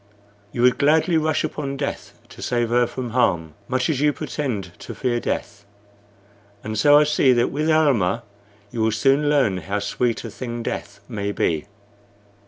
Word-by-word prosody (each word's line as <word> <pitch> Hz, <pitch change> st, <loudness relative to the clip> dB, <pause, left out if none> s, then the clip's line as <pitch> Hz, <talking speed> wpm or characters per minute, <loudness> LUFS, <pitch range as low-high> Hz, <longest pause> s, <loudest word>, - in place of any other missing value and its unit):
You 120 Hz, -, -1 dB
would 125 Hz, 0 st, +4 dB
gladly 160 Hz, +4 st, +3 dB
rush 155 Hz, -1 st, +1 dB
upon 140 Hz, -2 st, -3 dB
death 140 Hz, 0 st, -4 dB, 0.2 s
to -, -, -12 dB
save 120 Hz, -2 st, 0 dB
her 120 Hz, 0 st, +3 dB
from 125 Hz, -1 st, -5 dB
harm, 85 Hz, -10 st, +1 dB
much 130 Hz, 0 st, 0 dB
as 145 Hz, -4 st, 0 dB
you 150 Hz, 0 st, +4 dB
pretend 130 Hz, -, -4 dB
to -, -, -8 dB
fear 120 Hz, -2 st, 0 dB
death; 105 Hz, -3 st, -4 dB, 1.0 s
and 110 Hz, 0 st, -4 dB
so 145 Hz, +6 st, +6 dB
I 150 Hz, -, +6 dB
see 150 Hz, -3 st, +3 dB
that 120 Hz, 0 st, +1 dB
with 155 Hz, +3 st, -1 dB
Almah 120 Hz, -, +2 dB, 0.5 s
you 115 Hz, -, -3 dB
will 110 Hz, 0 st, +2 dB
soon 135 Hz, +6 st, +2 dB
learn 135 Hz, -10 st, +2 dB
how 95 Hz, +4 st, -3 dB
sweet 115 Hz, +3 st, -1 dB
a -, -, -6 dB
thing 120 Hz, -2 st, -5 dB
death 100 Hz, -, -5 dB
may 100 Hz, -3 st, -3 dB
be." 80 Hz, -3 st, -1 dB
125 Hz, 175 wpm, -22 LUFS, 110-145 Hz, 1.0 s, so